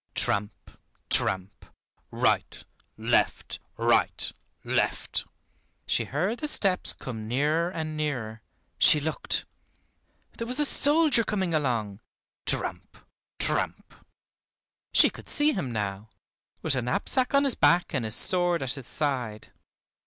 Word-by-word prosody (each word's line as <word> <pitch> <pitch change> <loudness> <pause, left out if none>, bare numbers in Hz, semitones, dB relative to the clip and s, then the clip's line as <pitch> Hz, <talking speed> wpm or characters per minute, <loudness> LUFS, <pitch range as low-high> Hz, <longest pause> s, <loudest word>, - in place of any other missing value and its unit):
Tramp, 105 0 -2 0.4
tramp; 95 +1 0 0.5
right, - - 0 0.3
left, - - 0 0.2
right, - - +1 0.3
left. - - -1 0.6
She - - 0
heard 185 - -2
the 300 - -3
steps 195 -10 +2
come 110 -4 -7
nearer 150 +8 +1
and 160 -3 -5
nearer. 120 -8 -3 0.4
She 150 - +7
looked! 155 +2 -2 0.9
There 230 - -3
was 250 +4 0
a 295 - +4
soldier 290 -3 +3
coming 190 -5 -2
along; 115 -9 -1 0.5
tramp, - - -2 0.4
tramp. - - -2 1.0
She - - +5
could - - -12
see 300 +1 +3
him 130 - -3
now, 105 -1 -4 0.5
with 160 - +1
a 130 - 0
knapsack 250 - 0
on 280 - +5
his 275 -3 +4
back, 175 0 +3
and 130 -5 0
his 110 0 -1
sword 175 -4 +3
at 130 -1 +4
his 135 -3 -7
side. 125 -8 -2
150 Hz, 125 wpm, -27 LUFS, 115-190 Hz, 1.0 s, She